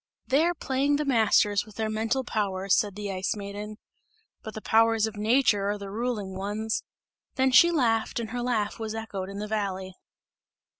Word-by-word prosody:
"They 275 +4 +3
are 350 0 +1
playing 275 0 0
the 300 +1 -1
masters 220 -5 +3
with 215 -1 -16
their 220 0 -1
mental 220 +4 -1
powers," 195 -4 0
said 205 -3 0
the 205 -1 -4
Ice 190 +3 -2
Maiden, 205 +1 -7 0.6
"but 220 - -8
the - - -4
powers 225 0 +3
of 220 0 -5
nature 210 -2 +2
are 205 - -1
the 200 -1 -8
ruling 215 -4 -3
ones!" 210 +3 -2 0.6
and 260 -1 +2
she 340 - +8
laughed 235 -9 +1
and 225 -2 -5
her 245 0 -3
laugh 225 -4 -1
was 220 -1 -4
echoed 200 -4 -5
in 200 - -7
the 210 +1 -4
valley. 195 -3 -3
215 Hz, 185 wpm, -27 LUFS, 205-235 Hz, 0.6 s, she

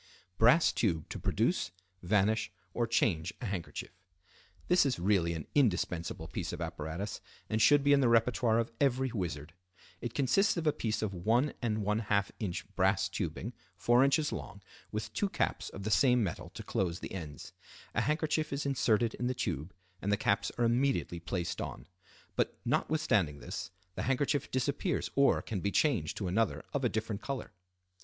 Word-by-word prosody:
Brass 125 +9 +6
Tube 85 -8 0
to - - -5
Produce, - - +1 0.3
Vanish, 105 +2 +2 0.2
or 120 -1 0
Change 90 -8 +1
a 125 - -5
Handkerchief.—This 100 - -3
is 135 -3 0
really 90 -2 +2
an 80 -3 -5
indispensable 90 - +1
piece 85 0 -4
of - - -6
apparatus 85 +3 -4 0.3
and 110 0 +1
should 145 +2 +6
be 145 0 +5
in 140 - +5
the 125 - +4
repertoire 115 0 +3
of 115 0 0
every 130 -2 +2
wizard. 85 -7 -4 0.5
It 120 -1 -5
consists 175 - +3
of 165 - -2
a 150 - +4
piece 110 -1 -1
of 105 - -1
1½in. 105 -1 0 0.2
brass 95 0 +2
tubing, 115 +6 -4 0.2
4 120 +6 +4
in. 140 - +4 0.2
long, 100 - -7 0.3
with 105 0 -4
two 205 - 0
caps - - -1
of 100 - -8
the 110 - -2
same 125 0 +4
metal 90 - -4
to - - -6
close 90 -2 -1
the - - -7
ends. 80 -7 -7 0.4
A - - +1
handkerchief 155 +1 0
is 140 +1 -2
inserted 120 -4 +2
in 125 - -2
the 130 - -1
tube 85 - -3 0.3
and 100 - -1
the 105 - +3
caps 100 +1 +1
are 120 - +2
immediately 120 -7 +1
placed 85 0 -3
on; - - -6 0.5
but - - 0
notwithstanding 100 - +1
this, 90 +4 -5 0.2
the - - -4
handkerchief 140 +2 0
disappears, 140 +7 -1
or 140 0 +4
can 105 -5 -3
be 100 - 0
changed 110 - +1
to 100 - -3
another 110 +6 0
of 140 - -1
a 120 - +3
different 110 -2 -3
color. 135 -1 -4
110 Hz, 165 wpm, -32 LUFS, 95-130 Hz, 0.5 s, Brass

